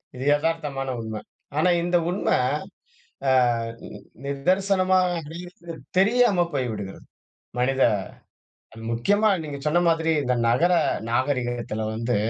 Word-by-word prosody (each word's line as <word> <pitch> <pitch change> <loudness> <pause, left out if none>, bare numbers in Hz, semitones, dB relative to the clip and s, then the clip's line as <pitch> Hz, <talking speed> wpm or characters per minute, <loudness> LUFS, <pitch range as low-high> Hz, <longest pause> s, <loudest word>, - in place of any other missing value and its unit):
இது 130 - -5
எதார்த்தமான 145 -4 -2
உண்ம. 110 -1 -5 0.4
ஆனா, 170 +4 +3
இந்த 175 0 +2
உண்ம 190 - -3 1.0
அ, - - +5 0.9
நிதர்சனமாகிறது 180 +2 0 0.3
தெரியாம 205 -3 +4
போய்விடுகிறது 110 -8 -4 0.5
மனித 135 +2 +1 1.1
முக்கியமா 205 - +2
நீங்க 145 -2 -6
சொன்ன 170 +3 +3
மாதிரி 165 0 +2
இந்த 125 -2 +1
நகர 170 +10 +3 0.4
நாகரீகத்துல 120 -3 -1
வந்து, 115 +1 -1
150 Hz, 95 wpm, -24 LUFS, 125-180 Hz, 1.1 s, அ